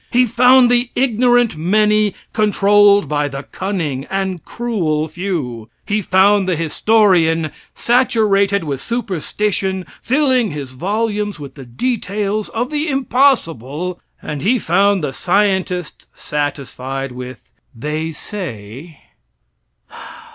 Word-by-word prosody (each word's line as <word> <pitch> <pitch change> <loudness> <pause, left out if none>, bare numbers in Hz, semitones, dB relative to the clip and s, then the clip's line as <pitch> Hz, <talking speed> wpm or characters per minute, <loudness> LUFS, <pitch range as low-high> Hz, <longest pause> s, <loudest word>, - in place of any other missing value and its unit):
He 250 +1 +3
found 250 +2 +5
the 240 0 +2
ignorant 245 -3 +2
many 210 +5 +2 0.2
controlled 205 -1 +4
by 145 -1 0
the 135 0 -6
cunning 165 -10 -4
and 190 -3 -2
cruel 170 -11 -2
few. 150 - -4 0.2
He 210 +1 0
found 195 +1 +3
the 185 - +1
historian, 165 -2 +2 0.2
saturated 205 -6 +2
with 140 -4 -4
superstition, 195 -3 -2 0.2
filling 260 -4 +2
his 145 -4 -6
volumes 205 - -2
with 140 -2 -9
the 135 -2 -11
details 210 - -2
of 240 +4 -3
the 300 +1 -1
impossible, 180 - 0 0.2
and 150 -2 -5
he 235 +7 +2
found 195 -1 +2
the 140 -3 -2
scientists 185 -1 -1
satisfied 135 -2 -4
with 125 0 -10 0.2
"they 150 +6 -3
say." 150 - -8
195 Hz, 110 wpm, -17 LUFS, 150-215 Hz, 0.2 s, found